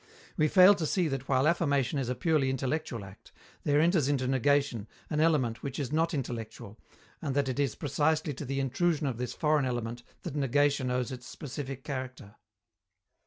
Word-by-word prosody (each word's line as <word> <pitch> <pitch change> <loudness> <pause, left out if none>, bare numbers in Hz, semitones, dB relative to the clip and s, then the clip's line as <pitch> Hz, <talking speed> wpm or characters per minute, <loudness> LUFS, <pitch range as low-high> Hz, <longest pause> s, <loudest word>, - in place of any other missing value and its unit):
We 155 - +3
fail 185 +4 +8
to 170 -6 -2
see 180 0 +1
that 135 -1 -4
while 135 +1 +3
affirmation 140 -6 +1
is 125 -3 -2
a 125 - -1
purely 155 -5 +1
intellectual 130 -4 -2
act, 95 - -15 0.3
there 145 0 +3
enters 165 -3 +3
into 130 -3 0
negation 135 -3 +1 0.2
an 150 - 0
element 145 -8 +2
which 135 -2 -5
is 140 -3 -3
not 165 +2 +1
intellectual, 115 -5 -6 0.4
and 140 -4 -2
that 140 -1 +1
it 130 +1 -2
is 140 -6 0
precisely 150 +1 0
to 140 - -7
the 135 +1 -2
intrusion 150 +4 0
of 125 -4 -2
this 125 -1 -3
foreign 150 -2 +2
element 120 -1 -3 0.2
that 170 - -5
negation 145 -1 +2
owes 125 0 -1
its 125 -1 -8
specific 135 -1 -6
character. 130 -6 -6
135 Hz, 180 wpm, -29 LUFS, 125-150 Hz, 0.4 s, fail